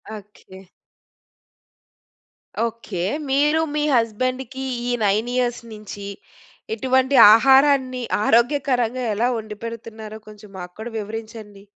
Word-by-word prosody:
Okay. 200 -2 -14 2.0
Okay. 220 -6 -5 0.3
మీరు, 295 +4 +2
మీ 300 - 0
హస్బెండ్‌కి 255 +3 -2 0.3
ఈ - - 0
9 215 +4 +1
ఇయర్స్ 245 -1 -1
నుంచి 210 -1 -9 0.7
ఇటువంటి 260 +3 +1 0.2
ఆహారాన్ని 265 0 +4 0.2
ఆరోగ్యకరంగా 250 0 +1
ఎలా 230 +4 +1
వండిపెడుతున్నారో 220 0 -8
కొంచెం 210 -1 -13
మాక్కుడా 185 +6 -8
వివరించండి. 215 -1 -8
230 Hz, 85 wpm, -21 LUFS, 215-255 Hz, 2.0 s, ఆహారాన్ని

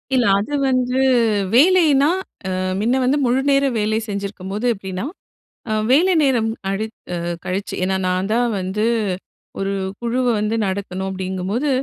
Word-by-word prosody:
இல்ல, 250 -2 +3
அது 215 +9 -4 0.2
வந்து 255 0 +1 0.6
வேலைன்னா 300 -2 +5 0.4
அ - - -2 0.3
மின்ன 235 +5 +1
வந்து 260 +3 +2
முழுநேர 275 +3 +2
வேலை 215 +1 +1
செஞ்சிருக்கும்போது 200 +1 -4
எப்டின்னா! 190 0 -5 0.6
அ - - 0 0.2
வேலை 350 +8 +5
நேரம் 245 -6 +2 0.2
கழித் 215 +3 -3 0.2
அ - - -2 0.3
கழிச்சு 195 +2 -3
என்னா 190 +1 +1
நான்தான் 205 +7 +1
வந்து 190 +4 -1 0.7
1 195 0 -1 0.3
குழுவ 240 +2 0
வந்து 215 +2 0
நடத்தணும் 190 -1 -3
அப்டிங்கும்போது, 190 +8 -2
220 Hz, 125 wpm, -20 LUFS, 195-255 Hz, 0.7 s, வேலைன்னா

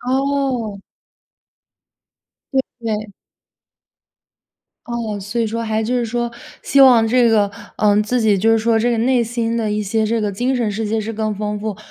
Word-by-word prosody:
哦。 260 -5 -1 1.7
对， 265 - +3 0.2
对。 215 -2 -3 1.7
哦， 230 -3 -3
所 205 +5 -3
以 230 - +1
说 230 +2 -3
还 220 -1 -1
就 225 +3 -1
是 240 - 0
说 240 +1 -2 0.3
希 275 - +3
望 245 -4 +7
这 240 +1 +3
个， 210 -2 +3 0.3
嗯， 210 0 +3
自 245 +4 0
己 215 -3 +3
就 215 +4 +2
是 225 - +4
说 225 +1 +2
这 230 +2 +2
个 235 - 0
内 245 +1 +2
心 230 0 -2
的 220 -2 -1
一 210 0 -1
些 215 +2 0
这 225 +1 0
个 210 -1 -1
精 250 +6 0
神 235 -3 0
世 220 +2 -3
界 220 +1 -1
是 220 +1 -4
更 215 0 -2
丰 210 0 -3
富， 215 -2 -4
225 Hz, 190 characters per minute, -19 LUFS, 215-240 Hz, 1.7 s, 望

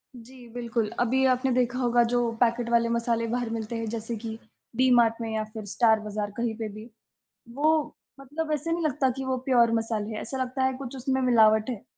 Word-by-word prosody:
जी, 245 +1 -13
बिल्कुल 235 -2 -2
अभी 255 +2 +2
आपने 255 +1 -1
देखा 250 0 0
होगा 240 -1 +3
जो 240 -1 +1
पैकेट 235 0 +1
वाले 235 0 +3
मसाले 230 0 0
बाहर 240 0 -2
मिलते 225 0 -4
हैं 225 - -3
जैसे 230 +1 -4
कि 225 -1 -5 0.4
डीमार्ट 240 -2 +3
में 225 - -3
या 220 0 -1
फ़िर 215 -2 -7
स्टार 220 0 +4
बाज़ार 210 -1 -4
कहीं 230 -1 -1
पे 220 -2 -4
भी। 215 +3 -10 0.7
वो 305 +3 +3 0.5
मतलब 305 +4 -5
ऐसे 305 +3 -2
नहीं 335 0 -1
लगता 275 -3 +1
कि 265 - -4
वो 260 -1 -1
प्योर 235 -3 +4
मसाले 225 -2 -1
हैं, - - -4
ऐसा 265 +4 -5
लगता 255 +1 -3
है 260 0 +2
कुछ 270 -1 -7
उसमें 265 +1 -1
मिलावट 220 -2 +4
है। 235 -5 -5
235 Hz, 205 wpm, -26 LUFS, 225-255 Hz, 0.7 s, स्टार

